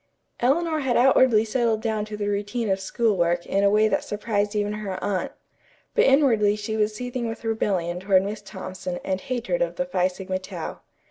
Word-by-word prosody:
Eleanor 315 +5 +2
had 265 -4 +1
outwardly 245 -3 +5
settled 225 -1 +1
down 220 -2 -1
to 215 0 -7
the 205 -1 -2
routine 205 +2 -1
of 190 - +1
school 215 +3 0
work 175 -1 +1
in 195 +1 0
a 200 - +5
way 215 +1 +4
that - - 0
surprised 210 0 -2
even 205 0 0
her 205 -3 -4
aunt. 195 -2 -1 0.6
But - - +4
inwardly 235 -7 +4
she 215 +1 -4
was 215 0 0
seething 245 0 -3
with 225 - -7
rebellion 185 -6 -1
toward 190 0 +3
Miss 205 +2 -4
Thompson 185 -2 -6
and 190 -1 -2
hatred 255 - -2
of - - 0
the 270 - -1
Phi 185 -9 +1
Sigma 185 0 -4
Tau. 185 -3 -7
210 Hz, 195 wpm, -24 LUFS, 190-235 Hz, 0.6 s, outwardly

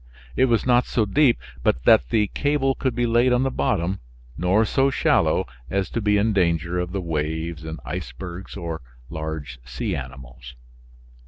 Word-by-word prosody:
It 130 - +4
was 120 -3 +1
not 125 -1 +3
so 110 - +1
deep 130 +4 +3 0.2
but 65 +1 +1
that - - +5
the 105 -2 +3
cable 145 -2 +1
could 130 -1 -2
be 120 - +1
laid 120 +2 +3
on 125 +1 +3
the 135 - 0
bottom, 90 -4 0 0.4
nor 95 +6 +2
so 135 +5 +2
shallow - - +2 0.2
as 100 -1 -1
to 115 - -2
be 105 0 +3
in 105 +2 +2
danger 85 -2 +1
of 90 0 -3
the 100 - -2
waves, 80 0 -3 0.2
icebergs 85 +11 -6
or 85 -3 -5 0.3
large 80 -6 -5
sea 60 0 -3
animals. 65 -1 -9
90 Hz, 165 wpm, -23 LUFS, 80-120 Hz, 0.4 s, that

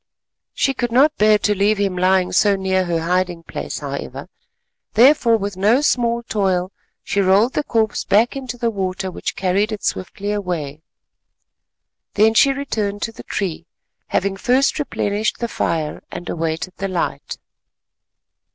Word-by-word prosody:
She 270 - +1
could 240 -2 -2
not 285 +5 +4
bear 215 0 +5
to 210 0 +1
leave 205 +2 +2
him 195 -2 0
lying 185 0 +2
so 205 -1 +3
near 190 -1 0
her 170 -2 -1
hiding 175 0 -1
place, - - -6
however; - - -6 0.6
therefore, 240 -2 +5
with 200 -2 -4
no 215 +8 +3
small 235 -4 +1
toil, 190 -4 0 0.3
she 200 - 0
rolled 200 +6 +3
the 300 - 0
corpse 225 -5 0
back 215 +6 +2
into 255 -3 -5
the 235 -1 0
water, 190 -2 -3
which - - -4
carried 195 +3 0
it 210 -2 -5
swiftly 200 +2 -3
away. 170 -8 -3 1.3
Then 220 +2 +4
she 275 +5 +5
returned 215 -7 -3
to 225 - -2
the - - -11
tree, 170 -4 -4 0.4
having 195 0 -1
first 255 +8 +2
replenished 210 -7 -1
the 235 - -2
fire, 160 -8 -2
and 175 - -7
awaited 165 +2 -3
the 195 - -2
light. 185 -3 -3
200 Hz, 150 wpm, -20 LUFS, 185-230 Hz, 1.3 s, bear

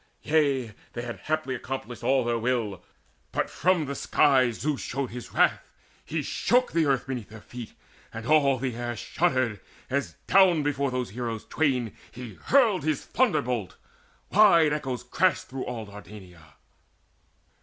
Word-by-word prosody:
Yea, 140 -7 +1 0.2
they 120 - -4
had 120 -1 -6
haply 155 -3 -2
accomplished 125 -2 -6
all 130 0 +2
their 120 -1 0
will, 115 -6 -1 0.5
But - - -1
from 180 -2 +2
the 140 - -4
sky 130 -2 +3
Zeus 140 +5 -2
showed 135 0 -3
his 120 0 -8
wrath; - - +3 0.4
he 155 -1 -3
shook 250 - +1
The 165 -2 +2
earth 135 -3 +1
beneath 125 -5 -5
their 110 0 -11
feet, 120 +1 -9 0.4
and 115 0 -7
all 140 -2 +4
the 125 -1 -3
air 120 0 -3
Shuddered, 130 - 0 0.3
as 140 +1 -1
down 185 -5 +5
before 140 -1 0
those 125 -4 -3
heroes 115 -1 -4
twain 130 -8 0 0.2
He 125 -3 -8
hurled 230 - +3
his 155 -2 -1
thunderbolt: 125 - 0 0.5
wide 170 -7 +6
echoes 130 -5 -3
crashed 175 +9 +1
Through 130 0 -5
all 115 -3 -5
Dardania. 100 -5 -13
130 Hz, 150 wpm, -27 LUFS, 120-150 Hz, 0.5 s, wide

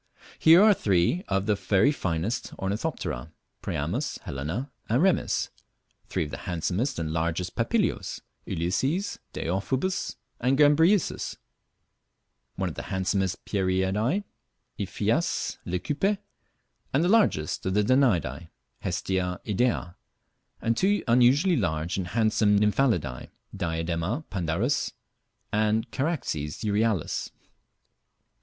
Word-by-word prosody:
Here 165 +5 +8
are 215 -1 +7
three 100 - +1
of 95 0 0
the 105 - +3
very 100 +6 +3
finest 95 - -2
Ornithopterae 100 - -3 0.3
priamus, 115 - -2
helena, 80 - -4 0.2
and 120 +4 +3
remiss; 185 +2 +2 0.6
three - - -1
of 75 - -7
the - - -5
handsomest 90 - -1
and 80 -2 -2
largest 85 +2 -1
Papilios - - 0 0.3
ulysses, 135 - -1
deiphobus, 130 - -1 0.2
and 130 +3 +2
gambrisius; 160 +6 +3 1.2
one - - -1
of - - -4
the - - -5
handsomest 95 0 -1
Pieridae, 100 - +1 0.6
Iphias - - -1
leucippe; 150 - 0 0.8
the 155 +6 +3
largest 195 - +2
of 95 - 0
the 105 - +4
Danaidae, 95 - +2 0.3
Hestia 90 -1 -1
idea; 105 -5 0 0.6
and 115 0 +1
two 200 - +2
unusually 125 +9 +5
large 85 - -1
and 95 -2 -2
handsome 105 0 +3
Nymphalidae 105 - +1 0.3
Diadema 85 - -2
pandarus, 95 - 0 0.6
and 110 +1 +1
Charaxes 130 - -2
euryalus. 105 -4 0
105 Hz, 105 wpm, -27 LUFS, 85-135 Hz, 1.2 s, Here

